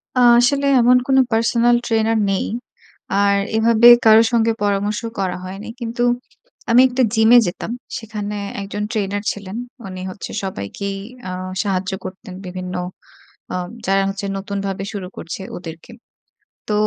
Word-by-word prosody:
আ - - +2 0.2
আসলে 280 +3 +2 0.2
এমন 250 +1 +6
কোনো 265 -1 +4
পার্সোনাল 230 +2 +3
ট্রেনার 225 0 +2
নেই। 195 - 0 0.8
আর 200 0 +3 0.2
এভাবে 230 +1 +5 0.2
কারো 220 0 +8
সঙ্গে 230 -1 +3
পরামর্শ 205 +1 0 0.2
করা 185 -2 -1
হয়নি। 195 +3 -7
কিন্তু 240 0 -2 0.7
আমি 235 +2 +7
একটা 255 +1 +1
জিমে 220 +2 +6
যেতাম। 175 +5 -5 0.3
সেখানে 210 -2 -5 0.3
১ 195 - -6
জন 210 - -2
ট্রেনার 205 -1 -2
ছিলেন। 200 +1 -7 0.3
উনি 185 -1 -7
হচ্ছে 190 - -8
সবাইকেই 195 - -4 0.3
আ - - -4 0.3
সাহায্য 195 -1 -1
করতেন 185 0 -8
বিভিন্ন 185 0 -6 0.8
আম 180 -1 -3 0.2
যারা 195 0 +3
হচ্ছে 195 +1 -4
নতুনভাবে 195 -1 -4
শুরু 200 -3 -5
করছে 170 - -6 0.2
ওদেরকে। 165 +4 -10 0.8
তো 210 - -1
205 Hz, 140 wpm, -20 LUFS, 195-225 Hz, 0.8 s, কারো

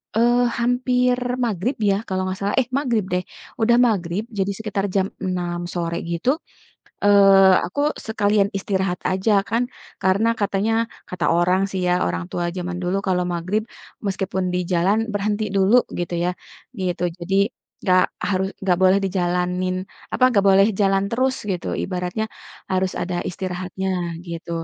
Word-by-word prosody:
eee, 240 +2 +4 0.2
hampir 250 +1 +2 0.3
maghrib 225 +4 -1 0.2
ya - - +3
kalau 185 0 -1
enggak 185 0 -3
salah 200 +1 -1
eh 245 - -4
magrib 240 -7 +1
deh, 180 0 +1 0.4
udah 235 +2 +5
magrib 190 -2 -1
jadi 195 0 +1
sekitar 205 -2 -2
jam 190 -1 +2 0.2
6.00 175 -2 -2
sore 170 -1 -2
gitu, 170 +8 0 0.8
eee, 195 -1 +7
aku 180 - -4 0.3
sekalian 205 -2 +2
istirahat 190 -2 -1
aja 190 +4 +1 0.2
kan 230 +3 +1 0.4
karena 190 +4 +3
katanya, 205 +2 +1 0.4
kata 180 -1 -4
orang 180 +2 +3
sih 190 - -3
ya, 180 - +3
orang 85 0 -2
tua 175 - -1
zaman 180 0 -3
dulu 180 +2 0
kalau 180 -1 +2
maghrib 180 +5 -1 0.4
meskipun 190 -1 -1
di - - +1
jalan, 185 +5 +3
berhenti 205 +1 -1
dulu 195 +3 +4 0.2
gitu 175 0 -3
ya, 180 - +2 0.5
gitu. 180 -1 -2 0.2
Jadi 180 +2 -3 0.5
enggak 185 -1 +4 0.3
harus 190 0 +1
enggak 180 -2 +2
boleh 190 +1 +6
dijalanin, 180 0 0 0.4
apa 255 - +3
enggak 200 -5 +2
boleh 195 +1 +6
jalan 195 -1 +3
terus 260 +2 +1 0.2
gitu 180 -2 -3 0.2
ibaratnya 180 +3 -2 0.5
harus 185 0 +1
ada 180 +1 -2 0.2
istirahatnya 185 +1 -4 0.4
gitu. 170 0 -7
190 Hz, 150 wpm, -22 LUFS, 180-205 Hz, 0.8 s, eee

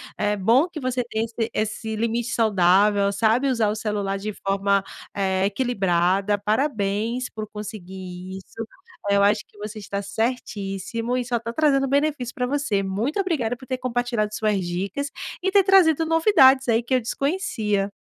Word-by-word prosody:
é 210 0 0
bom 235 - +4
que 320 - -7
você 255 -2 -1
tenha 225 -1 -2
esse 230 0 -3
esse 220 +1 -2
limite 230 +1 -1
saudável, 200 -2 +3
sabe 225 +6 +2
usar 230 -5 +2
o 210 - -1
celular 205 -2 -2
de 210 +1 -4
forma, 195 0 0 0.3
eh, 190 -1 +1
equilibrada. 195 -3 +1
Parabéns 220 +1 -1
por 215 -1 -6
conseguir 190 -3 -8
isso. 225 +4 -8 0.5
Eu 200 0 +4
acho 210 +1 +3
que 210 - -25
você 210 +1 -7
está 200 0 -4
certíssimo 220 +1 -3
e 250 - -2
só 240 0 0
tá 230 0 -5
trazendo 275 0 +2
benefício 280 -3 0
para 250 0 -2
você. 275 -8 0
Muito 215 - -2
obrigada 305 - 0
por 260 - -13
ter 255 - -2
compartilhado 245 -4 -1
suas 210 -4 0
dicas 195 - -3 0.3
e 380 - +1
ter 400 0 +6
trazido 345 -5 +5
novidades, 295 - +5
aí, 230 +1 +3
que 255 +2 0
eu 255 - +2
desconhecia. 225 - -1
220 Hz, 165 wpm, -23 LUFS, 200-255 Hz, 0.5 s, ter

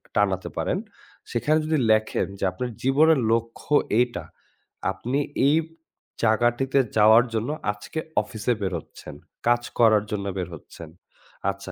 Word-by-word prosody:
টানাতে 95 -2 +1
পারেন, - - 0 0.5
সেখানে 150 +6 +2
যদি 155 0 +1
লেখেন 110 0 +1
যে - - -5
আপনার 125 +7 -4
জীবনের 145 +4 +4
লক্ষ্য 115 +5 -2 0.3
এইটা। 120 -1 0 0.7
আপনি 130 +4 -2 0.3
এই 145 - +4 0.7
জায়গাটিতে 120 +4 +2 0.2
যাওয়ার 110 +3 +7
জন্য 115 +3 -1 0.2
আজকে 105 +10 -7 0.2
অফিসে 110 +1 -2
বের 95 -2 -1
হচ্ছেন, - - -12 0.3
কাজ 120 0 +4 0.2
করার 110 -3 +5
জন্য 100 -2 -2
বের 90 -2 -2
হচ্ছেন। 80 +1 -12 0.6
আচ্ছা 100 -1 -6
115 Hz, 130 wpm, -24 LUFS, 105-125 Hz, 0.7 s, যাওয়ার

